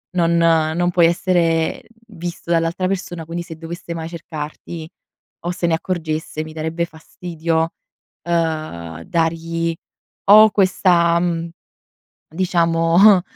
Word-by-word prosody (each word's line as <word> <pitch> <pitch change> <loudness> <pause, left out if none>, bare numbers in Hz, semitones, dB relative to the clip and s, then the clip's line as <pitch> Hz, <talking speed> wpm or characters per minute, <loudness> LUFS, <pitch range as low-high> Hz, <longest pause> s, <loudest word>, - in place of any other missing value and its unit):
non 170 -1 +2
non 165 +1 +2
puoi 175 -1 +4
essere 170 -2 +1 0.2
visto 175 -3 -6
dall'altra 170 +2 +1
persona, 180 -3 -3
quindi 170 +2 -4
se 165 -2 -9
dovesse 170 +1 -7
mai 165 0 -5
cercarti, 160 0 -7 0.6
o 175 - 0
se 175 - -2
ne 165 - +3
accorgesse 160 -3 -3
mi 155 - -9
darebbe 160 +2 -2
fastidio, 165 0 -3 0.5
ehm, 155 - -2
dargli 165 - -1 0.6
o 215 +1 +9
questa, 175 -4 +3
mhmm, 170 -1 -1 0.9
diciamo, 175 +2 +4
165 Hz, 110 wpm, -20 LUFS, 160-175 Hz, 0.9 s, o